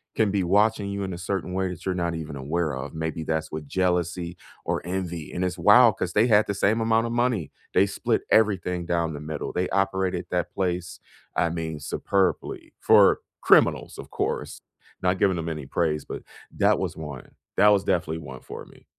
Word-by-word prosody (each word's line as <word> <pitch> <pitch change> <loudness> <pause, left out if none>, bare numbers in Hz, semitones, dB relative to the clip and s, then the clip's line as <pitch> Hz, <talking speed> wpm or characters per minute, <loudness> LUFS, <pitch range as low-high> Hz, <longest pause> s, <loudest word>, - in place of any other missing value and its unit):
can 110 -2 +2
be 100 -2 +1
watching 105 +3 +2
you 100 0 -3
in 95 - -4
a - - -6
certain 90 +1 -3
way 95 0 0
that 90 -3 -7
you're 95 -1 0
not 85 -1 -1
even 80 -2 -6
aware 75 +4 -2
of, 65 +4 -6
maybe 80 0 -3
that's 80 0 -2
with 75 -1 -6
jealousy 90 0 -1 0.3
or - - -1
envy, 85 -3 -4
and 90 - -2
it's 90 - -2
wild 110 0 +6
'cause 90 -1 -3
they 110 +4 +4
had 105 -2 +5
the 100 - -1
same 105 +3 +2
amount 115 +1 +2
of - - -4
money. 120 - 0 0.2
They - - +5
split - - -1
everything 90 -5 +2
down 85 -2 0
the - - -6
middle. 75 0 -5
They 90 +1 -1
operated 95 -2 0
that 90 -1 -2
place, 90 -2 -2 0.4
I 85 - +2
mean, 80 -2 -4
superbly, 95 +5 -1
for - - +5 0.2
criminals, - - +4
of - - -9
course, - - -3 0.4
not 90 0 +1
giving 95 -2 +3
them 85 0 -3
any 75 -4 -5
praise, 75 +1 -1
but - - -6 0.3
that - - +3
was - - -3
1. 75 -5 -8 0.3
That 105 - +7
was 100 -2 +4
definitely 80 -2 0
1 65 -4 -9
for - - -9
me. - - -19
90 Hz, 200 wpm, -25 LUFS, 80-100 Hz, 0.4 s, That